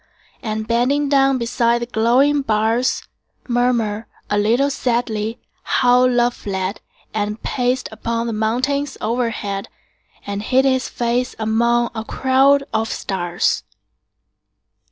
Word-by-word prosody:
And 215 -1 -3
bending 260 +5 +1
down 270 -1 +4
beside 235 0 +1
the - - -2
glowing 250 +6 +3
bars, 225 +1 +1 0.4
Murmur, 235 -3 0 0.2
a 205 - +2
little 240 +7 +2
sadly, 230 -4 -1 0.2
how 250 0 +3
love 245 -1 +2
fled 190 -1 -4 0.3
10 210 -1 0
And 210 +1 -7
paced 250 0 0
upon 230 +1 -2
the 230 - -2
mountains 255 +7 -1
overhead, 220 -4 -2 0.6
And 200 0 -3
hid 255 +5 +2
his 260 -1 +1
face 240 +1 -1
amid 235 +2 +1
a 220 -1 -4
crowd 270 +3 +3
of 220 +1 0
stars. 175 -2 -1
235 Hz, 120 wpm, -20 LUFS, 220-255 Hz, 0.6 s, down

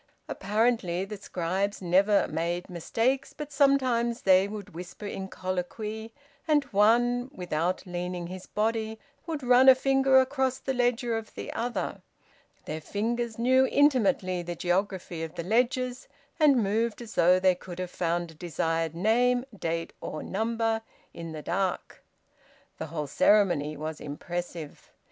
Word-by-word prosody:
Apparently 205 -3 0
the 210 +1 -7
scribes 190 +2 -2
never 195 +3 +3
made 170 +3 -3
mistakes, 235 +10 -1
but 300 -1 -6
sometimes 255 -4 +2
they 190 0 +5
would 205 -4 -8
whisper 180 +5 -8
in 195 -1 -5
colloquy, 210 +5 -4 0.4
and 300 -2 +4
one, 240 +5 +3
without 180 - -2
leaning 180 0 -4
his 185 +1 -8
body, 220 0 -1 0.3
would 310 -4 -4
run 250 +1 +7
a 260 - +9
finger 270 0 +4
across 260 -1 +1
the 265 - -3
ledger 245 -1 +1
of 225 -1 -6
the - - -6
other; 240 +1 -3 0.6
their 155 +1 -5
fingers 230 +5 -2
knew 260 +3 +4
intimately 220 -11 +2
the 175 0 -5
geography 180 -1 -1
of 165 0 -6
the 170 - -4
ledgers, 250 - 0 0.3
and 280 -7 +5
moved 220 +3 0
as 230 - -10
though 180 +2 +5
they 185 0 +4
could 180 0 -10
have 180 -1 -4
found 170 0 -1
a - - -14
desired 165 0 -2
name, 245 +6 +2
date, 165 -3 -3
or 155 - -5
number, 225 +2 -1 0.3
in 165 -1 -7
the 155 -1 -7
dark. 190 -2 -2 0.8
The - - -4
whole 150 -1 -4
ceremony 155 -3 +3
was 155 +1 -5
impressive. 170 +1 -6
205 Hz, 145 wpm, -28 LUFS, 175-245 Hz, 0.8 s, a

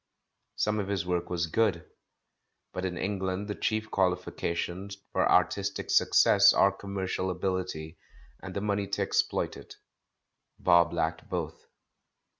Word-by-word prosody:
Some 105 0 0
of 100 - -2
his 100 -3 -1
work 90 -1 -1
was 85 -2 0
good, 105 +5 0 0.9
but 95 - -3
in 90 -1 -3
Eng 100 0 -2
land 95 +2 -2
the 105 - -2
chief 110 +1 -2
qualifications 90 +1 -2
for - - +2
artistic 95 +3 +1
success - - +6
are 100 - +4
commercial 95 -1 -3
ability, 90 -3 -3 0.4
and 95 -1 -8
the 100 - -1
money 100 -1 -1
to 100 - -1
exploit - - 0
it; - - -12 0.8
Bob 85 -2 +4
lacked 80 -1 -2
both. 85 -3 -4
95 Hz, 135 wpm, -29 LUFS, 90-100 Hz, 0.9 s, success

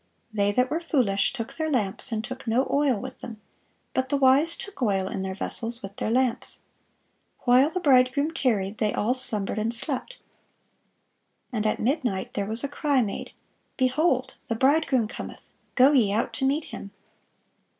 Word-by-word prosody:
They 205 -1 +1
that 250 +4 +1
were 320 - 0
foolish 245 -12 +1
took 250 0 -6
their 315 -1 -2
lamps, 235 -3 +1
and 220 -1 -2
took 255 +1 -8
no 240 +4 +1
oil 280 -6 +2
with - - -8
them: 225 -3 -8 0.5
but 260 0 -1
the 285 - +1
wise 275 +5 +4
took 400 -7 -10
oil 195 -5 +1
in 190 - -4
their 190 0 -4
vessels 230 +3 -3
with 195 0 -8
their - - -2
lamps. 250 0 0 0.8
While 255 +4 +4
the 365 - -3
bridegroom 280 0 +3
tarried, 215 -9 -1
they 210 -1 +1
all 225 +4 +1
slumbered 215 -5 +4
and 220 +2 -1
slept. 280 - -3 1.3
And 215 -3 -1
at - - -1
midnight 245 -7 -1
there 200 -1 -2
was 220 +4 -1
a - - 0
cry 285 -2 +1
made, 205 - -5 0.5
Behold, 260 0 +1
the 230 - -1
bridegroom 265 -2 +2
cometh; - - -9 0.2
go 265 +2 +6
ye 240 -9 +3
out 215 +3 -1
to 265 - -2
meet 290 +4 0
him." 200 - -7
250 Hz, 170 wpm, -25 LUFS, 215-275 Hz, 1.3 s, go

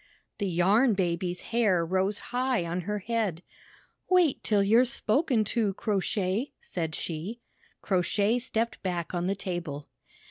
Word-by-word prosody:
The 200 - 0
Yarn 200 +7 +3
Baby's 175 -1 -1
hair 200 -8 +3
rose 190 +4 +1 0.2
high 250 -6 +1
on 170 +2 -2
her 210 +4 -2
head. 205 -5 -2 0.7
"Wait 360 -6 +3
till 205 -2 +3
you're 225 +5 +5
spoken 245 0 +1
to. 210 -5 +1
Crow 205 -2 0
Shay!" 200 +5 -1
said 160 -3 -4
she. 175 +8 -5 0.4
Crow 185 -3 +2
Shay 205 +6 +1
stepped 230 -2 -2
back 175 -3 -3
on 175 0 -1
the 195 - 0
table. 175 -7 -5
200 Hz, 145 wpm, -28 LUFS, 175-230 Hz, 0.7 s, you're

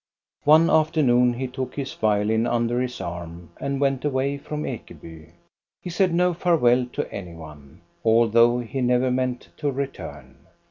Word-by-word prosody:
One 155 +3 +6
afternoon 130 -6 +3
he 130 +2 -3
took 130 0 -5
his 135 -2 -4
violin 110 +2 +1
under 120 +1 0
his 125 -1 -4
arm 85 0 -7
and 140 -1 -2
went 135 -2 0
away 140 0 -1
from 150 +1 -5
Ekeby. 80 -2 -9 0.5
He 180 - -7
^aid 185 +2 +2
no 180 +1 +2
farewell 130 -8 +2
to - - -4
any 90 -4 -7
one, 75 -4 -13 0.2
although 115 +1 +4
he 130 +3 -4
never 125 +1 +2
meant 125 -1 -2
to 145 - -1
return. 135 0 -7
125 Hz, 150 wpm, -23 LUFS, 110-140 Hz, 0.5 s, One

